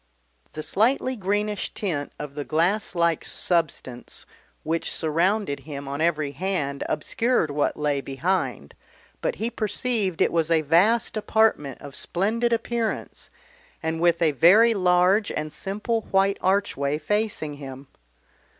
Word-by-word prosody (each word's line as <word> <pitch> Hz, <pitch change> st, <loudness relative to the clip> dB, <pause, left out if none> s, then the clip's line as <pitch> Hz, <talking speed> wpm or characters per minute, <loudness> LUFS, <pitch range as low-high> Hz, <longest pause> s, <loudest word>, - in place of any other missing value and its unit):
The 155 Hz, -, -5 dB
slightly 255 Hz, -, +1 dB
greenish 205 Hz, 0 st, -1 dB
tint 155 Hz, -9 st, -3 dB
of 150 Hz, -2 st, -7 dB
the 145 Hz, 0 st, -4 dB
glass 180 Hz, +8 st, 0 dB
like 170 Hz, -2 st, +1 dB
substance 155 Hz, -8 st, -2 dB, 0.4 s
which 165 Hz, +1 st, -2 dB
surrounded 170 Hz, 0 st, 0 dB
him 140 Hz, 0 st, -8 dB
on 140 Hz, +2 st, -4 dB
every 155 Hz, -3 st, +1 dB
hand 145 Hz, -4 st, -2 dB
obscured 195 Hz, -, 0 dB
what 145 Hz, 0 st, 0 dB
lay 145 Hz, -2 st, 0 dB
behind, 135 Hz, -, -2 dB, 0.5 s
but -, -, -1 dB
he 225 Hz, +4 st, -3 dB
perceived 215 Hz, -4 st, -1 dB
it -, -, +3 dB
was 165 Hz, -2 st, +1 dB
a 165 Hz, -1 st, +3 dB
vast 200 Hz, +10 st, +3 dB
apartment 215 Hz, -, +1 dB
of 140 Hz, -1 st, -9 dB
splendid 220 Hz, -, 0 dB
appearance, 230 Hz, 0 st, -2 dB, 0.5 s
and 160 Hz, 0 st, -2 dB
with 170 Hz, -1 st, +3 dB
a 160 Hz, -, +4 dB
very 200 Hz, -, +6 dB
large 185 Hz, +2 st, +3 dB
and 155 Hz, 0 st, -4 dB
simple 210 Hz, +4 st, -2 dB
white 195 Hz, +1 st, +2 dB
archway 180 Hz, -7 st, +1 dB
facing 205 Hz, -3 st, -2 dB
him. 135 Hz, -1 st, -9 dB
170 Hz, 130 wpm, -24 LUFS, 150-210 Hz, 0.5 s, very